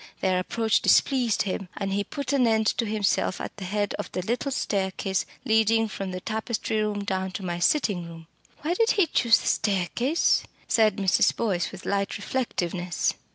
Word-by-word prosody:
Their 185 -1 +2
approach 220 +3 +1
displeased 250 -5 +3
him, 190 -1 -4
and 195 0 -2
he 200 +1 0
put 280 +4 -4
an 255 -4 +3
end 220 -1 +2
to 230 - +1
himself 210 -3 0
at - - -6
the 195 - -6
head 205 +2 -1
of - - -5
the 180 - -2
little 240 +7 -1
staircase 195 -4 -1 0.2
leading 225 0 +3
from 195 -2 -5
the 185 0 -4
tapestry 220 +1 -2
room 210 -1 -1
down 190 -1 -2
to 190 - -5
my 175 -1 -3
sitting 180 - +1
room. 165 -1 -11 0.4
Why 325 +3 +1
did 450 +5 +2
he 395 -4 +4
choose 235 -7 +4
the - - -7
staircase?" 210 - +1 0.3
said 215 -3 +3
Mrs. 195 -3 +3
Boyce 190 -7 -1
with - - -10
light 200 +1 -1
reflectiveness. 180 -7 -2
205 Hz, 180 wpm, -26 LUFS, 190-230 Hz, 0.4 s, he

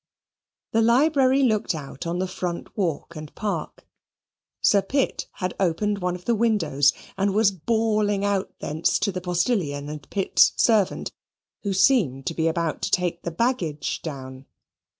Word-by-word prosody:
The 225 - +3
library 265 +3 +4
looked 215 -8 +1
out 140 0 -7
on 170 +1 -2
the 185 +1 -1
front 180 -1 -5
walk 170 -4 -2
and 155 -1 -8
park. 210 -1 -4 0.7
Sir 200 - +4
Pitt 270 +6 -1
had 180 -1 -3
opened 200 +3 0
one 180 -1 -1
of 180 - -11
the 235 - +2
windows, 175 -11 +2 0.3
and 195 0 +1
was 215 -2 +4
bawling 210 +1 0
out 200 -1 0
thence 155 +2 0
to 205 - 0
the 185 -1 -5
postilion 175 - -1
and 150 -2 -8
Pitt's 195 -2 +3
servant, 215 -5 +2 0.5
who 200 - -2
seemed 185 - +3
to - - -2
be 160 0 0
about 165 -1 -1
to - - -1
take 175 -2 0
the - - -3
baggage 170 - -1
down. 130 -3 -8
185 Hz, 155 wpm, -24 LUFS, 160-215 Hz, 0.7 s, library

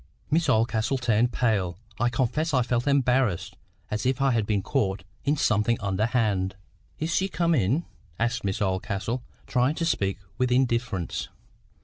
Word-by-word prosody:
Miss 160 -1 +2
Oldcastle 115 +2 +2
turned 120 -1 +2
pale. 100 -9 0 0.2
I 120 - +3
confess 135 +6 0
I 125 - +4
felt 120 +2 -1
embarrassed, 130 -8 +2 0.4
as 105 0 -1
if 130 0 +1
I 135 0 +3
had 115 -4 +1
been 100 -3 +1
caught 100 -8 0 0.2
in 145 +2 +2
something 110 -1 +2
underhand. 100 -1 0 0.4
"Is 160 +2 -2
she 190 - +2
come 170 +1 +1
in?" 135 - +1 0.3
asked 115 +1 0
Miss 100 +1 -1
Oldcastle, 100 +5 -2 0.2
trying 130 +4 +1
to 165 - -1
speak 100 - 0 0.2
with 125 -1 +2
indifference. 120 -8 0
120 Hz, 150 wpm, -26 LUFS, 105-135 Hz, 0.4 s, I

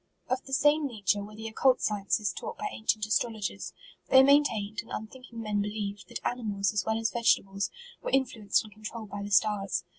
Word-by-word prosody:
Of 255 +1 -1
the 270 - -7
same 295 +2 +4
nature 205 -5 0
were 210 +1 -10
the 220 +1 -6
occult 255 +3 +3
scien 205 -2 -2
ces 210 -4 +2
taught 470 0 -6
by 420 - -3
ancient 220 -1 0
astrologers. 215 -3 -1 0.4
Thej 265 0 +8
maintained, 220 -8 +3
and 230 - -19
unthinking 235 +2 -7
men 210 -2 0
believed, 205 -1 -4
that - - -5
animals, 210 -5 -1
as 205 -2 +1
well 220 0 0
as 225 0 0
vegetables, 200 -4 +1 0.3
were - - -3
in 270 0 +3
fluenced 220 -4 0
and 215 -1 -13
controlled 215 0 -8
by 205 - -4
the 200 - -5
stars. 200 -2 +2
215 Hz, 200 wpm, -29 LUFS, 205-240 Hz, 0.4 s, Thej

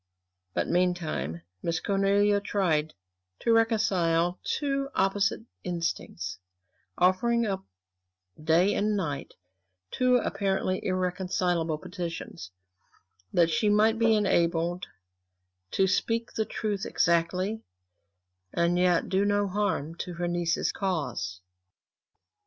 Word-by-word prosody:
But - - 0
meanwhile 170 - 0 0.2
Miss 165 -1 -1
Cornelia 200 +1 +2
tried 160 -7 0 0.5
to 230 - +3
reconcile 180 -7 +2
two 275 -1 -1
opposite 195 +2 +1 0.2
instincts; 165 - -3 0.6
offering 230 +6 +3
up 195 -2 -2 0.8
day 170 +6 +4
and 210 0 +1
night 150 -7 -4 0.6
two 255 0 +3
apparently 190 -4 -1
irreconcilable 180 -3 0
petitions; 170 - -6 0.8
that 170 -1 +3
she 210 +7 +2
might 215 +2 +3
be 225 -1 +4
enabled 175 -3 +1 0.8
to 190 - +2
speak 230 +5 0
the 220 - 0
truth 210 -3 -3
exactly, 180 +5 +1 0.9
and 170 +1 +1
yet 180 -2 +3
do 190 +1 +2
no 205 0 +2
harm 190 -6 -1
to 180 -1 -5
her 175 +1 -2
niece's 175 -1 0
cause. 125 - -3
185 Hz, 100 wpm, -28 LUFS, 170-205 Hz, 0.9 s, day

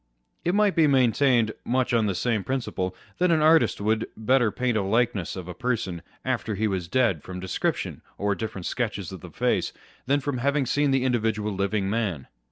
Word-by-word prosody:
It 175 +3 +1
might 210 -2 +3
be 160 -2 +5
maintained, 125 -3 +3
much 125 0 0
on 115 -2 +3
the 95 - -1
same 110 +1 0
principle, 95 -8 -2 0.2
that 180 0 +3
an 160 -2 +3
artist 160 +1 +4
would 110 +2 +1 0.2
paint 125 +5 +3
a - - -1
better 115 +1 0
likeness 110 -2 0
of 90 -2 -7
a 90 - -5
person 95 -5 -2 0.2
after 120 -4 -1
he 110 +3 0
was 95 -4 -2
dead, 105 - +2
from 90 0 -7
description 95 -1 -2 0.2
or 100 0 +1
different 100 -4 -5
sketches 105 -7 -2
of 95 -3 -8
the - - -9
face, - - 0 0.3
than 140 +2 +3
from 140 -2 -3
having 140 +2 +1
seen 145 +3 +1
the 135 -1 +2
individual 110 -4 0
living 100 +1 0
man. 100 - -1
115 Hz, 190 wpm, -26 LUFS, 100-130 Hz, 0.3 s, be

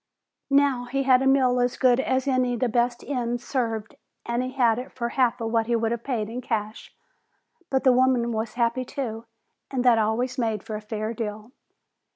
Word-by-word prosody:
Now 275 -3 +3
he 275 +3 -1
had 260 -1 +5
a 270 - +1
meal 260 -2 +3
as 245 0 0
good 255 -1 +4
as 260 0 0
any 255 -2 +1
the 245 +2 0
best 240 +1 0
inns 245 -3 -3
served 225 -5 -2 0.3
and 235 +1 -1
he 255 0 -3
had 240 -4 +2
it 255 - -8
for 235 -2 -3
half 250 -1 +1
of 225 -1 -3
what 225 -1 +1
he 235 - +1
would 225 0 0
have 235 -1 -3
paid 230 -6 -2
in 240 +3 -5
cash. 215 -2 -4 0.8
But 265 -1 0
the 260 - +6
woman 250 -2 +2
was 220 0 -3
happy 240 +1 +1
too, 235 -3 -5 0.4
and 255 -2 -2
that 235 -2 +5
always 240 +4 0
made 220 -4 -1
for 220 -1 -6
a 210 - -5
fair 215 +1 -4
deal. 215 0 -6
240 Hz, 200 wpm, -25 LUFS, 225-255 Hz, 0.8 s, the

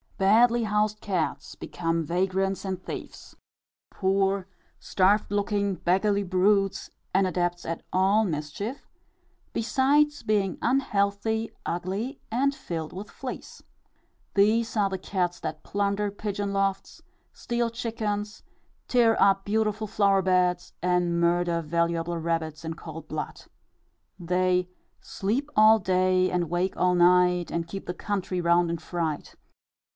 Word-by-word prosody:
Badly 230 +5 +4
housed 210 0 0
cats 170 -7 -2
become 165 -1 -2
vagrants 190 +4 -1
and 185 -1 -4
thieves, - - -8 0.6
poor, 195 0 0 0.3
starved 200 +2 +2
looking, 200 -1 0
beggarly 200 +4 +1
brutes, 195 +1 +1 0.2
and 195 0 +3
adepts 175 -1 -1
at 165 0 -4
all 195 +4 +3
mischief, 185 - -4 0.7
besides 285 +6 +2
being 200 -3 0
unhealthy, 220 -3 0
ugly, 195 - -3
and 275 +5 +2
filled 165 - -5
with 200 +3 -7
fleas. 260 -2 -8 0.7
These 220 +3 +2
are 200 -2 +3
the 190 - -3
cats 180 -2 -2
that 160 -1 -5
plunder 200 0 -1
pigeon 205 -1 -3
lofts, 195 +8 -1 0.3
steal 235 -1 -2
chickens, 215 -2 -4 0.4
tear 235 -3 +3
up 195 0 +4
beautiful 215 0 0
flower 200 -2 +3
beds, 180 -1 +1
and 180 -1 +1
murder 170 0 +2
valuable 170 +1 -1
rabbits 160 -1 -2
in 160 - -3
cold 160 -1 -9
blood. 155 -1 -5 0.8
They 180 +1 +1 0.3
"Sleep 240 +9 -2
all 215 +1 +7
day, 185 0 +2
and 175 -3 -1
wake 175 +2 -1
all 180 0 +3
night, 180 0 +4
And 170 0 -2
keep 195 +2 -7
the 180 - -2
country 190 -2 -2
round 170 0 +3
in 170 - -1
fright." 160 -3 -4
190 Hz, 125 wpm, -26 LUFS, 175-210 Hz, 0.8 s, all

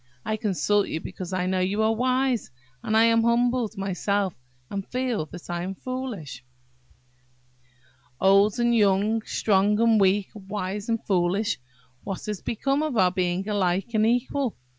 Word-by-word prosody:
I 215 - 0
consult 205 -1 +1
you 160 - -3
because 180 +2 -7
I 185 -1 -1
know 185 0 0
you 195 +4 +1
are 220 +1 +3
wise; 255 +1 0 0.3
and 220 - 0
I 225 - +6
am 230 0 +4
humbled 235 -1 +1
myself, 195 0 -1 0.4
and 195 -1 -3
feel 245 -10 -2
that 175 +2 -11
I 175 0 -3
am 190 +2 -4
foolish." 210 - -6 1.8
"Old 195 +3 +4
and 240 0 +2
young–strong 210 0 +2
and 225 -2 +4
weak–wise 200 +1 -1
and 230 -1 -1
foolish–what 175 - -2
has 210 -3 -4
become 275 +5 -1
of 305 -6 -2
our 185 -3 +4
being 185 +1 -1
alike 195 +1 0
and 215 0 +3
equal? 245 +1 0
205 Hz, 140 wpm, -25 LUFS, 185-230 Hz, 1.8 s, I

